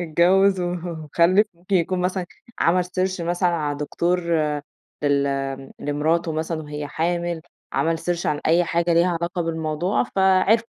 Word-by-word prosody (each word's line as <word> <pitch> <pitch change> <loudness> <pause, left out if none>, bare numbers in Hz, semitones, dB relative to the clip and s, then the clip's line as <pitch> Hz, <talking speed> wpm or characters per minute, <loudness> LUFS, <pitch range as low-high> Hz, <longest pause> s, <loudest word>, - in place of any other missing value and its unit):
اتجوز 185 +4 +3
وخلّف 175 +2 +1
ممكن 180 +3 -1
يكون 180 +1 0
مثلًا 180 0 -1 0.3
عمل 180 +1 +3
سيرش 185 0 -2
مثلًا 175 +2 +1
على 150 -4 -2
دكتور 175 +4 0 0.8
لل 140 -1 +2
آمم، 135 -1 -3
لمراته 160 +3 0
مثلًا 160 0 -3
وهي 150 0 -5
حامل، 170 +2 -1 0.3
عمل 165 0 +1
سيرش 175 0 -2
عن 150 -1 0
أي 170 +2 +4
حاجة 170 0 +1
ليها 170 +2 +4
علاقة 175 +1 -2
بالموضوع 160 +2 -1
فعرفوا. 190 +4 +4
170 Hz, 140 wpm, -23 LUFS, 155-180 Hz, 0.8 s, أي